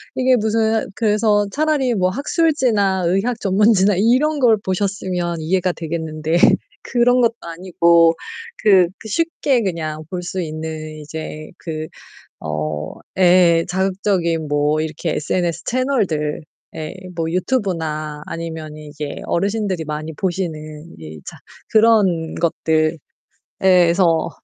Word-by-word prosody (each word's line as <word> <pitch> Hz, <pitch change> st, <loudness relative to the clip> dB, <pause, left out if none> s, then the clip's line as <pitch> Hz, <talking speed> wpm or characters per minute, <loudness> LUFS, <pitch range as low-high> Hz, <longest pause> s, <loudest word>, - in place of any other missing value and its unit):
이게 255 Hz, 0 st, +3 dB
무슨 220 Hz, 0 st, +1 dB
그래서 210 Hz, -1 st, +2 dB
차라리 290 Hz, -5 st, +1 dB
뭐 185 Hz, -3 st, +1 dB
학술지나 245 Hz, -, +1 dB
의학 210 Hz, +7 st, 0 dB
전문지나 200 Hz, 0 st, +3 dB
이런 260 Hz, +8 st, +2 dB
걸 235 Hz, -4 st, +5 dB
보셨으면 185 Hz, -3 st, -2 dB
이해가 180 Hz, +2 st, 0 dB
되겠는데 160 Hz, 0 st, -2 dB, 0.5 s
그런 245 Hz, 0 st, +3 dB
것도 230 Hz, -1 st, +3 dB
아니고 170 Hz, -1 st, +3 dB, 0.5 s
그 190 Hz, -5 st, +6 dB
그 220 Hz, -, -11 dB
쉽게 280 Hz, -1 st, 0 dB
그냥 155 Hz, -5 st, -3 dB
볼 180 Hz, -1 st, -4 dB
수 185 Hz, +1 st, -3 dB
있는 155 Hz, -1 st, -6 dB
이제 155 Hz, 0 st, -7 dB
그 155 Hz, -2 st, -5 dB, 0.6 s
어 75 Hz, 0 st, -3 dB, 0.3 s
예. 175 Hz, -2 st, +5 dB
자극적인 185 Hz, -4 st, 0 dB
뭐 145 Hz, +1 st, +1 dB
이렇게 160 Hz, +1 st, -3 dB
SNS 170 Hz, +3 st, -1 dB
채널들 210 Hz, -, -1 dB, 0.3 s
예, 155 Hz, +2 st, -5 dB, 0.2 s
뭐 165 Hz, -1 st, -2 dB
유튜브나 165 Hz, -, -2 dB
아니면 160 Hz, -2 st, -6 dB
이제 150 Hz, -1 st, -7 dB
어르신들이 195 Hz, -2 st, -1 dB
많이 150 Hz, +1 st, -4 dB
보시는 160 Hz, -3 st, -4 dB
이 80 Hz, -1 st, -10 dB
자 -, -, -9 dB, 0.3 s
그런 205 Hz, -8 st, +3 dB
것들. 160 Hz, -1 st, 0 dB, 0.7 s
예 -, -, +4 dB, 0.2 s
그래서 170 Hz, -1 st, +2 dB
175 Hz, 250 characters per minute, -19 LUFS, 155-210 Hz, 0.7 s, 그